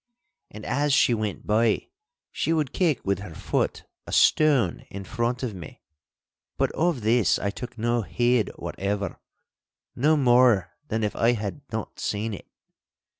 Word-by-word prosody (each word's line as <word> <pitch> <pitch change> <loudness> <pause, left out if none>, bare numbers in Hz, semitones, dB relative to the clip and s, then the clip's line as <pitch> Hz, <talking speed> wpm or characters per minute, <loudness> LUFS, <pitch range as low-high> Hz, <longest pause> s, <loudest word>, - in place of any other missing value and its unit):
And 105 +1 -10
as 145 +1 +1
she 125 - +4
went 110 -4 -3
by, 110 +1 +1 0.4
she 165 - 0
would 155 -5 -1
kick 165 -8 +1
with 100 -1 0
her 90 -5 -9
foot - - -2 0.2
a - - -7
stone 140 - +4
in 100 0 -7
front 120 +3 -2
of 120 -4 -2
me. 85 -5 -11 0.7
But - - +1
of 165 -6 0
this 110 -1 +3
I 100 - -2
took 120 +3 -8
no 120 +1 +1
heed 120 +2 +1
whatever, 100 0 -3 0.8
no 155 +5 +3
more 120 - +4
than 110 -1 -1
if 105 - -1
I 115 +1 +3
had 105 +3 -4
not 110 -1 -5
seen 110 +1 -2
it. 100 - -9
115 Hz, 155 wpm, -25 LUFS, 105-125 Hz, 0.8 s, she